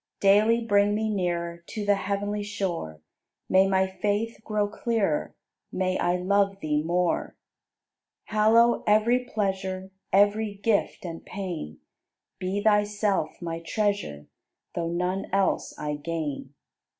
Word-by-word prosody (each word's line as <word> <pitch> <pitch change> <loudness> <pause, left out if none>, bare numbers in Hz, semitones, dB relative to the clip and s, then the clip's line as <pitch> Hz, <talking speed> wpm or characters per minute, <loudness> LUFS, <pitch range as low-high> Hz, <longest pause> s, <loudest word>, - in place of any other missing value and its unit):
Daily 215 +4 +4
bring 205 -1 +3
me 220 0 0
nearer 170 -3 -2
To 210 -2 -5
the 205 - +4
heavenly 205 +1 -2
shore; 185 - -4 0.5
May 190 +1 +5
my 190 0 +3
faith 205 +4 -2
grow 210 -1 0
clearer. 215 - -1 0.4
May 185 0 0
I 175 - +2
love 195 +2 +1
Thee 150 -4 0
more! 175 +2 0 0.9
Hallow 225 +3 +4
every 225 +4 +4
pleasure, 190 -4 -2 0.2
Every 205 +1 +3
gift 205 0 0
and 165 -1 -6
pain; 170 - -6 0.6
Be 195 +2 -2
Thyself 205 -5 +1
my 165 -1 -3
Treasure. 200 - -2 0.5
Though 165 -1 -2
none 180 +3 -1
else 195 0 0
I 150 -1 -3
gain. 145 -3 -4
195 Hz, 120 wpm, -26 LUFS, 175-210 Hz, 0.9 s, May